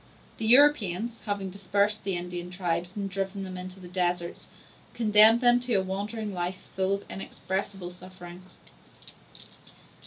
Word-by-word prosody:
The 220 - -1
Europeans, 235 -5 +5
having 200 -2 -3
dispersed 200 +2 0
the 195 -2 -1
Indian 175 0 -5
tribes 180 -1 -3
and 200 -1 -3
driven 195 0 -4
them 185 -1 -7
into 185 +1 -8
the 180 - -11
deserts, 175 -1 -2 0.5
condemned 220 +1 +6
them 245 0 +6
to 245 -2 -1
a 190 - +2
wandering 205 +3 -4
life 180 +1 -4
full 190 +1 +1
of 200 - -9
inexpressible 190 -1 -5
sufferings. 180 0 -13
190 Hz, 135 wpm, -27 LUFS, 180-210 Hz, 0.5 s, condemned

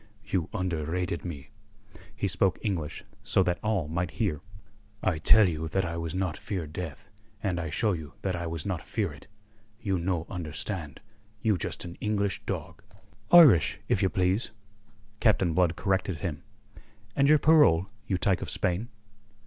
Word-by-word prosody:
"You 90 -5 -1
underrated 90 -2 -2
me." 70 -6 -7 0.6
He 105 -1 -1
spoke 95 0 +1
English, 85 -8 -3 0.2
so 95 - +3
that 90 -1 0
all 105 -7 0
might 85 +2 -2
hear. 95 - 0 0.6
"I 85 -4 +1
tell 105 +5 +7
you 80 -2 -2
that 95 +4 0
I 85 0 -3
was 85 +1 -3
not 95 -4 -1
fear 95 -6 -4
death, 80 -1 -7 0.4
and 90 -4 0
I 80 -1 -3
show 105 +7 +1
you 80 -4 -7
that 95 -2 0
I 85 -1 -3
was 80 -2 -4
not 95 -4 -2
fear 100 -8 -2
it. 70 - -15 0.5
You 95 -6 -1
no 85 -1 -1
understand. 80 -2 -4 0.4
You 110 -2 +3
just 90 - -3
an 85 0 -9
English 100 -3 0
dog." - - -5 0.5
"Irish, 155 - +7
if 100 - +2
you 95 - +3
please," 95 +5 0 0.7
Captain 95 -6 +3
Blood 85 -1 +2
corrected 95 -2 0
him. 80 -4 -4 0.7
"And 140 0 +4
your 155 - +7
parole, 145 - +5 0.2
you 95 - +1
tyke 90 0 +1
of - - -4
Spain?" 95 +7 -1
90 Hz, 165 wpm, -28 LUFS, 80-100 Hz, 0.7 s, tell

